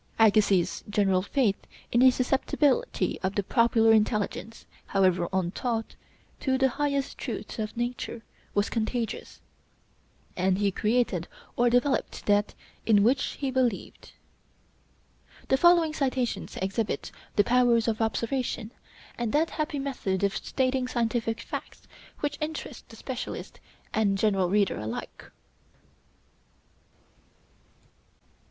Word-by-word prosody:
Agassiz's 205 -5 +3
general 195 -3 +2
faith 210 -1 0 0.2
in 235 - +3
the 260 +1 +8
susceptibility 270 - +1
of 190 +1 -2
the 205 - +1
popular 230 0 +4
intelligence, 215 +1 0 0.2
however 185 -3 +2
untaught, 215 +6 -2 0.5
to 260 -1 +1
the 265 0 +3
highest 280 +1 -2
truths - - -5
of 215 +1 -4
nature, 240 -1 -3 0.3
was 205 +1 +2
contagious, 230 0 -3 0.9
and 185 0 +1
he 200 0 +1
created 215 -4 0 0.3
or 245 0 +3
developed 245 +3 0
that 205 0 +2 0.3
in 205 -3 +4
which 255 +5 +2
he 275 -2 -3
believed." 250 -6 -2 1.4
The 265 - +4
following 340 0 +5
citations 260 -4 -2
exhibit 195 +3 -2 0.3
his 205 - +5
powers 240 -2 +3
of 225 0 0
observation, 230 0 -1 0.5
and 235 -2 -1
that 320 +2 +2
happy 300 -2 -2
method 245 -9 -2
of 200 0 +1
stating 255 -1 0
scientific 230 -2 -1
facts - - -7 0.3
which 290 0 -2
interests 310 +1 -5
the - - -12
specialist - - -6 0.3
and 200 -3 +2
general 195 -3 +2
reader 200 - +2
alike. 110 +1 -6
230 Hz, 115 wpm, -27 LUFS, 205-260 Hz, 1.4 s, the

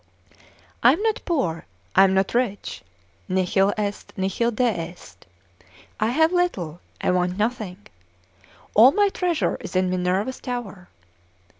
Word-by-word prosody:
I - - +7
am - - -3
not 445 -1 0
poor, 175 - -1 0.3
I 195 - +8
am 190 0 +2
not 190 0 +1
rich; 235 -4 -2 0.5
nihil 190 +2 +2
est, 205 -1 -4
nihil 195 +5 0
deest, 215 - -3 0.7
I 215 - +2
have 320 +7 +3
little, 185 - -1 0.2
I - - +1
want 180 0 0
nothing: 215 -4 -2 1.0
all 245 +6 +7
my 410 -1 +3
treasure 355 -4 -1
is - - -8
in 185 0 +2
Minerva's 185 +7 -1
tower. 220 -8 -6
205 Hz, 130 wpm, -23 LUFS, 185-250 Hz, 1.0 s, I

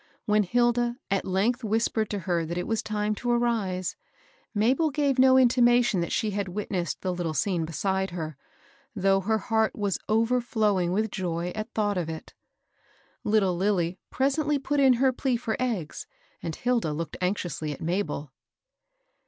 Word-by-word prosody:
When 210 0 +3
Hilda 240 +3 +1
at 195 - +1
length 210 +7 +1
whispered 220 0 0
to 205 - -2
her 170 -1 0
that 170 +2 -4
it 180 - -2
was 225 -1 -1
time 210 -1 -1
to 245 +3 -4
arise, 225 -7 0 0.6
Mabel 255 +9 +2
gave 280 -2 0
no 260 0 +7
intimation 240 -4 +4
that 170 - -3
she 215 - 0
had 200 0 -2
witnessed 185 -2 -3
the 185 -1 -1
little 170 -3 -3
scene 170 +2 0
beside 190 +4 -1
her, 160 -3 -5 0.6
though 195 -1 +3
her 220 +3 +1
heart 220 +1 0
was 205 -3 -1
overflowing 220 -5 +2
with 215 +3 0
joy 175 -1 -2
at 215 +2 -5
thought 205 -3 +1
of 165 -2 -3
it. 160 -1 -7 0.9
Little 205 -4 +2
Lilly 180 -1 0
presently 290 +2 +1
put 285 +1 -1
in 265 -2 +6
her 260 +2 +2
plea 250 -1 0
for 230 -2 -2
eggs, 225 -12 -3 0.3
and 160 -2 -4
Hilda 235 -11 0
looked 165 +2 -4
anxiously 175 -5 -2
at 145 - -7
Mabel. 170 -5 -2
210 Hz, 160 wpm, -27 LUFS, 180-240 Hz, 0.9 s, no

